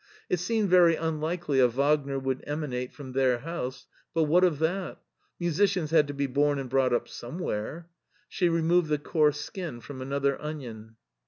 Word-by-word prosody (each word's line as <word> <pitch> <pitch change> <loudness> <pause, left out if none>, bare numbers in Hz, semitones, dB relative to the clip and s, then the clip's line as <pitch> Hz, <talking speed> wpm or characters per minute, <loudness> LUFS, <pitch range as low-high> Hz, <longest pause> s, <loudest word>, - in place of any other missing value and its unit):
It 180 - +1
seemed 215 +3 0
very 175 -2 +6
unlikely 160 -2 -1
a 125 - +7
Wagner 140 +2 +1
would 130 -1 -2
emanate 140 -4 -3
from 135 -3 -9
their 130 -1 +2
house, 135 -5 -5 0.3
but 165 - +3
what 170 +4 +4
of 175 -5 +3
that? 175 +5 -2 0.4
Musicians 175 -1 +1
had 155 -2 +5
to 145 - -5
be 140 0 0
bom 145 +2 +1
and 135 -1 -4
brought 130 0 +2
up 120 - 0
somewhere. 145 - -5 0.4
She 180 -4 +1
removed 165 0 +2
the 150 - +2
coarse 150 -1 +1
skin 170 -11 -6
from 130 +2 -9
another 140 +1 -1
onion. 120 -8 -7
150 Hz, 170 wpm, -28 LUFS, 135-165 Hz, 0.4 s, a